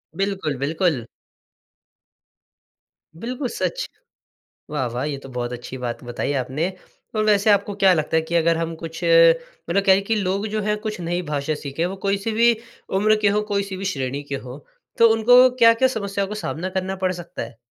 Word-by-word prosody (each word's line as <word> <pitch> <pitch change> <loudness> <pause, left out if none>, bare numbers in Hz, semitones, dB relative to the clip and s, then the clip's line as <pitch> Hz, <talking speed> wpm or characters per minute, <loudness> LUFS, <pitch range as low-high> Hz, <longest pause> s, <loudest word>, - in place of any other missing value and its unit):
बिल्कुल, 195 -7 -2
बिल्कुल। 145 - 0 2.1
बिल्कुल 250 - -4
सच। - - -2 0.9
वाह, 135 -4 0
वाह! 125 +2 -2
ये 140 - -3
तो - - -9
बहुत 120 0 -3
अच्छी 125 +2 -7
बात 120 0 -4
बताई 120 +3 -3
आपने, 130 +6 -2 0.5
और 215 - +1
वैसे 210 0 +3
आपको 205 0 +3
क्या 190 -1 +7
लगता 155 -2 -1
है - - +3
कि - - +1
अगर 165 0 +2
हम 165 0 -3
कुछ 165 -1 -7
मतलब - - +3
क्या 190 - +7
है 195 - +1
कि 225 - +3
लोग 195 +3 -1
जो 215 - 0
हैं 210 0 +1
कुछ 210 -3 -4
नई 175 +1 -1
भाषा 145 +1 -1
सीखें 145 +4 -2
वो 185 +2 -3
कोई 195 0 +2
सी 225 - 0
भी 235 - +7 0.5
उम्र 215 +2 +4
के - - +5
हो - - +2
कोई 200 0 +1
सी 190 - -5
भी 195 - -5
श्रेणी 135 +1 -3
के 140 -1 -4
हों, 125 +3 -8 0.4
तो 230 - +7
उनको 240 +3 +6 0.2
क्या-क्या 230 +3 +6
समस्याओं 200 -1 -2
का 210 - -5
सामना 180 +4 -3
करना 190 +1 -4
पड़ 185 - +2
सकता 170 - -8
है? 115 0 -10
185 Hz, 195 wpm, -22 LUFS, 145-210 Hz, 2.1 s, क्या